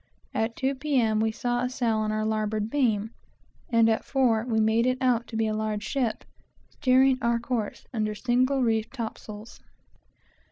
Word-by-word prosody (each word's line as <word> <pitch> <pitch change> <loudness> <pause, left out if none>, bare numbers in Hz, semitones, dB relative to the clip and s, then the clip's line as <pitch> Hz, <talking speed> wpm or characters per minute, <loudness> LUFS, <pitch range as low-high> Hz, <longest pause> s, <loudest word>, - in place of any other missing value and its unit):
At 225 +1 -1
two, 270 +1 0
P.M., 260 -6 +1
we 220 0 +1
saw 245 +1 -1
a 250 - 0
sail 240 -3 0
on 215 0 0
our 215 0 -1
larboard 215 0 -1
beam, 225 -6 +1 0.6
and 230 -2 +4
at 220 -1 +1
four 245 -5 +2
we 225 -2 +1
made 220 +2 +3
it 255 0 +1
out 245 -3 +1
to 225 - -5
be 225 - +1
a 215 - -1
large 215 -1 -2
ship, 240 -1 -2 0.5
steering 260 -1 +3
our 235 0 +2
course, 235 -3 -3
under 215 -2 -1
single 255 +4 +1
reefed 225 0 0
topsails. 220 -2 -7
230 Hz, 170 wpm, -26 LUFS, 220-255 Hz, 0.6 s, and